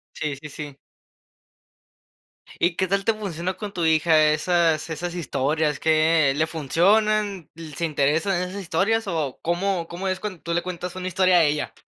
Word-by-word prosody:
Sí, 150 -2 -3
sí, 150 - -8
sí. 145 -1 -8 1.8
¿Y 170 0 +1
qué 190 - +1
tal 195 +1 0
te 225 - +3
funciona 185 -4 -4
con 210 -2 -7
tu 175 - -2
hija 155 -1 +4
esas-esas 165 +1 0
historias? 150 -1 -1
¿Qué 155 -2 +3
le 155 +2 +1
funcionan? 195 +4 +1
¿L 160 -3 -10
se 170 - -1
interesa 155 +5 +1
en 180 - -3
esas 200 +2 -6
historias, 200 +6 0
o, 155 -7 -2
cómo 175 0 -1
cómo 180 +3 -5
es 185 0 -1
cuando 195 -5 -6
tú 170 - -3
le 175 - +1
cuentas 180 0 -6
una 185 0 -4
historia 185 0 +3
a 165 - +5
ella? 150 0 -1
170 Hz, 170 wpm, -23 LUFS, 155-185 Hz, 1.8 s, a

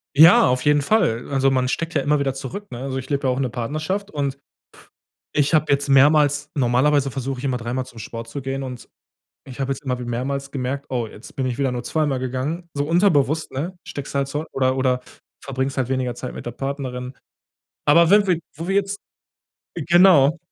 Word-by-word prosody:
Ja, 160 +1 +8
auf 125 0 0
jeden 145 0 +4
Fall. 140 - +1
Also, 135 -1 +2
man 130 -1 +1
steckt 165 +6 -2
ja 145 - +1
immer 150 +1 +2
wieder 135 -2 0
zurück, 135 +10 -7
ne? 120 - -6
Also, 135 0 -4
ich 130 0 -6
lebe 140 -2 0
ja 130 - +2
auch 125 - -4
in 135 - 0
'ner 125 - -1
Partnerschaft 155 - -3
und 140 -5 -3 0.9
ich 145 +1 +1
habe 155 -1 +3
jetzt 140 0 +1
mehrmals 145 +1 +4
normalerweise 135 +2 +2
versuche 135 0 -4
ich - - -9
immer 130 -2 0
dreimal 120 +2 -3
zum 120 -3 -14
Sport 115 +2 -7
zu 140 +5 -5
gehen 135 +1 -4
und 125 -2 -7 0.6
ich 135 0 -10
habe 135 0 0
jetzt 135 - -8
immer 130 -2 -1
mehrmals 130 +3 -3
gemerkt: 135 +1 -3
„Oh, 120 -3 -2
jetzt 105 +1 -13
bin 135 - -1
ich 125 -2 -3
wieder 135 -2 +1
nur 120 - -3
zweimal 150 -4 0
gegangen.“ 130 +7 -3
So 145 0 -1
unterbewusst, 160 -4 +2
ne? 165 +8 -4
Steckst 140 -1 -7
halt 140 -1 0
zurück 150 +3 -4
oder 130 0 +1
oder 130 -1 +1 0.4
verbringst 135 0 -2
halt 130 -3 0
weniger 130 -2 -1
Zeit 125 +1 -6
mit - - -8
der 120 - -3
Partnerin. 130 -1 -4 0.7
Aber 165 +3 +6
wenn 205 +1 +6
wir 175 -3 +2 0.2
wo 165 +4 -6
wir 195 - +1
jetzt 200 0 0 0.8
genau. 170 -2 +5
135 Hz, 210 wpm, -22 LUFS, 130-150 Hz, 0.9 s, Ja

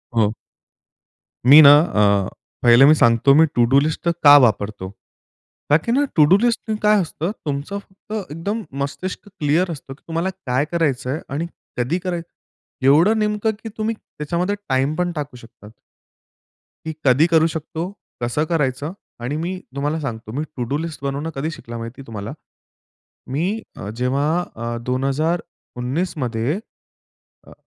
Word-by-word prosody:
हं. 110 -2 +3 1.2
मी 150 +3 +11
ना 140 - +11
अ, 100 - +2 0.3
पहिलं 120 +2 +7
मी 155 - +7
सांगतो 120 +2 +4
मी 160 +2 +7
टु 120 - +4
डू 135 +2 +6
लिस्ट 155 +3 -1
का 145 0 +10
वापरतो? 105 -6 +1 0.8
का 150 - +6
की 235 - 0
ना 285 +3 +3
टु 150 -2 +6
डू 195 - +7
लिस्ट 235 0 0
काय 210 0 +5
असतं 170 +1 -3
तुमचं 145 +8 -3
फक्त 200 -1 -8
एकदम 200 +8 -3 0.2
मस्तिष्क 185 +8 -6
क्लिअर 170 -1 0
असतं 135 -3 -8
की 140 - -22
तुम्हाला 165 +3 -1 0.2
काय 130 +3 +1
करायचंय 140 -4 0
आणि 150 +5 -3 0.3
कधी 135 +9 0
करायचं. 175 -2 -4 0.6
एवढं 165 +11 +5
नेमकं 210 +1 0
की 225 - -5
तुम्ही 220 +1 -1
त्याच्यामध्ये 175 +2 -3
टाईम 135 +3 +1
पण 175 0 -1
टाकू 145 -5 -5
शकता. 115 -3 -15 1.2
की 160 - -3
कधी 135 +6 +5
करू 165 -1 +4
शकतो? 160 0 -5 0.4
कसं 120 +6 0
करायचं? 145 -1 -1 0.3
आणि 125 +5 -3
मी 180 +3 -3 0.2
तुम्हाला 145 +3 -1
सांगतो, 115 -6 -6
मी 145 +5 -2
टु 125 - -1
डू 145 - 0
लिस्ट 160 -3 -6
बनवणं 140 +3 -2
कधी 150 +4 -2
शिकला 120 -6 -8
माहिती 115 +4 -7
तुम्हाला? 105 -3 -6 1.0
मी 150 +5 0 0.3
अ, 100 - -7
जेव्हा 135 +3 +1 0.3
अ, 115 +1 -4
2019 140 +3 -2
मध्ये 125 - -1 0.9
अ, - - -14
150 Hz, 150 wpm, -21 LUFS, 130-170 Hz, 1.2 s, मी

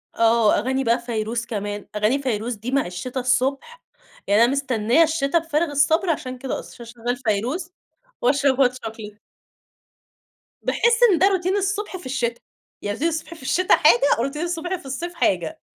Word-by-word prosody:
آه 230 -2 +4
أغاني 265 +4 -1
بقى 235 0 +2
فيروز 230 0 -3
كمان، 205 -2 -5
أغاني 215 +6 +1
فيروز 235 -2 -2
دي 225 +5 -6
مع 275 -1 +1
الشتا 185 +9 -5
الصبح 265 - -1 0.4
يعني 205 +3 +5
أنا 240 - +3
مستنية 260 +1 +2
الشتا 310 -1 +1
بفارغ 325 -1 -1
الصبر 315 +5 +2
عشان 255 -5 -2
كده 260 +1 -4
أصلًا، 235 -1 -11
عشان 230 0 -14
أشغل 245 +1 -1
فيروز 255 - -2 0.5
وأشرب 275 +1 +2
hot - - -7
.chocolate 220 -4 -8 1.5
باحس 470 -1 +2
إن 345 - +2
ده 380 - +5
روتين 380 0 +1
الصبح 400 0 -2
في 355 - -14
الشتا، 245 -3 -2 0.4
يعني 205 +1 -3
روتين 315 - +1
الصبح 320 0 -5
في 315 - -15
الشتا 360 +7 +3
حاجة، 275 -2 +4
وروتين 275 +5 -2
الصبح 350 +1 -2
في 345 - -11
الصيف 300 +7 -5
حاجة، 180 - -1
260 Hz, 170 wpm, -22 LUFS, 230-325 Hz, 1.5 s, يعني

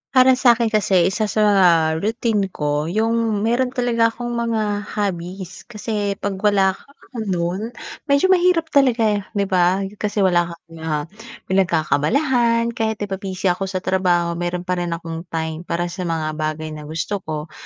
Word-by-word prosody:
Para 255 0 +6
sa'kin 235 -3 +4
kasi 195 -4 +3
isa 215 +1 -1
sa, 215 0 +1
ah, 175 -6 +5
routine 215 -1 0
ko 150 -3 -2
'yung 220 +1 0
meron 250 +3 0
talaga 235 -2 +2
akong 240 +1 -5
mga 220 -3 -1
hobbies, 185 -2 -4
kasi 210 -3 -3
'pag 195 -1 -4
wala 195 -2 +3
ako 190 - -15 0.4
nun 175 +1 -1 0.5
medyo 280 +6 +3
mahirap 355 -3 +3
talaga, 255 -5 +3
eh, 210 -1 +2
'di 200 - +1
ba, 185 +1 +3 0.2
kasi 205 -1 0
wala 175 -2 +3
kang, 165 -1 -15
ah, 155 -2 -2 0.5
pinagkakaabalahan 230 - +2
kahit, 220 -2 -1
'di - - -3
ba, 190 - -1
busy 190 -1 -1
ako 195 +2 -3
sa 185 -1 -4
trabaho, 180 -2 +1
meron 175 0 -2
pa 180 0 -1
rin 175 -1 -2
akong 165 0 -7
time 160 0 -4
para 175 +1 -2
sa 180 -1 -4
mga 160 -2 -1
bagay 155 0 -3
na 150 -1 -8
gusto 165 +6 -3
ko. 155 -3 -6
195 Hz, 165 wpm, -20 LUFS, 170-225 Hz, 0.5 s, Para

